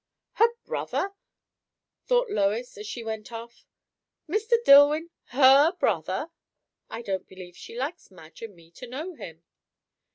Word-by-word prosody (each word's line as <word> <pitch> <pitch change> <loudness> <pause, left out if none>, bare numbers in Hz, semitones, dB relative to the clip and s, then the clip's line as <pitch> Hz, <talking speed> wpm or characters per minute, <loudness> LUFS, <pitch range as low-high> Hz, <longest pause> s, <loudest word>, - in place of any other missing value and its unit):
Her 455 - +4 0.2
brother! 390 - -3 1.0
thought - - +2
Lois 220 - -1
as 210 +1 -9
she 235 +1 -6
went 220 0 -6
off. 230 +1 -10 0.6
Mr. 430 +8 -1
Dillwyn, 295 +4 +6
her 275 +5 +5
brother! 365 - -1 0.6
I 235 - -7
don't 190 -3 -4
believe 180 -2 -12
she 230 - -11
likes 275 +7 -5
Madge 165 -4 -16
and 225 -4 -9
me 165 -1 -20
to 250 +8 -11
know 305 +9 -6
him. 165 - -11
245 Hz, 135 wpm, -26 LUFS, 200-315 Hz, 1.0 s, Dillwyn